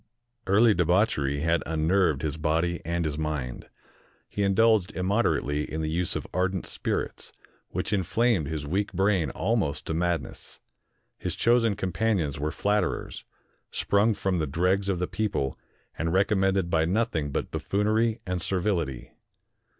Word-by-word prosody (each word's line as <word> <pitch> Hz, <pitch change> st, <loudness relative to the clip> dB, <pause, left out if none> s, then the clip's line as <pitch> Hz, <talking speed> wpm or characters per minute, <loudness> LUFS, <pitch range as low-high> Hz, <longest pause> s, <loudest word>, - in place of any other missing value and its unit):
Early 105 Hz, +4 st, +5 dB
de 90 Hz, -, +2 dB
bauchery 80 Hz, -6 st, +1 dB
had 85 Hz, +1 st, +2 dB
unnerved 80 Hz, -1 st, +2 dB
his 75 Hz, -1 st, -1 dB
body 80 Hz, +3 st, 0 dB
and 85 Hz, 0 st, -1 dB
his 75 Hz, 0 st, -2 dB
mind. 75 Hz, -6 st, -4 dB, 0.6 s
He 100 Hz, -, -4 dB
in 100 Hz, -1 st, +2 dB
dulged 110 Hz, -3 st, +4 dB
immoderately 90 Hz, -7 st, 0 dB
in 80 Hz, -, -2 dB
the 80 Hz, -, -2 dB
use 85 Hz, +1 st, -1 dB
of -, -, -3 dB
ardent 95 Hz, 0 st, 0 dB
spirits, -, -, -3 dB, 0.4 s
which -, -, -2 dB
inflamed 100 Hz, -, +1 dB
his 75 Hz, -1 st, -4 dB
weak 95 Hz, +8 st, -1 dB
brain 95 Hz, -4 st, +2 dB
almost 90 Hz, -, -1 dB
to -, -, -2 dB
madness. 85 Hz, 0 st, -3 dB, 0.6 s
His -, -, -3 dB
chosen 115 Hz, -3 st, +3 dB
companions 95 Hz, -6 st, -1 dB
were 75 Hz, +1 st, -1 dB
flatterers, 105 Hz, +4 st, -1 dB, 0.4 s
sprung 105 Hz, +2 st, +2 dB
from 95 Hz, -3 st, -1 dB
the 80 Hz, -, 0 dB
dregs 90 Hz, +7 st, +1 dB
of 95 Hz, -, +1 dB
the 90 Hz, -, 0 dB
people, 95 Hz, -8 st, -2 dB, 0.4 s
and 85 Hz, 0 st, -1 dB
recommended 95 Hz, -1 st, +2 dB
by 80 Hz, 0 st, +3 dB
nothing 90 Hz, -5 st, 0 dB
but -, -, -3 dB
buffoonery 110 Hz, +3 st, 0 dB
and 90 Hz, -1 st, -2 dB
servility. 90 Hz, -, -1 dB
90 Hz, 145 wpm, -27 LUFS, 80-100 Hz, 0.6 s, Early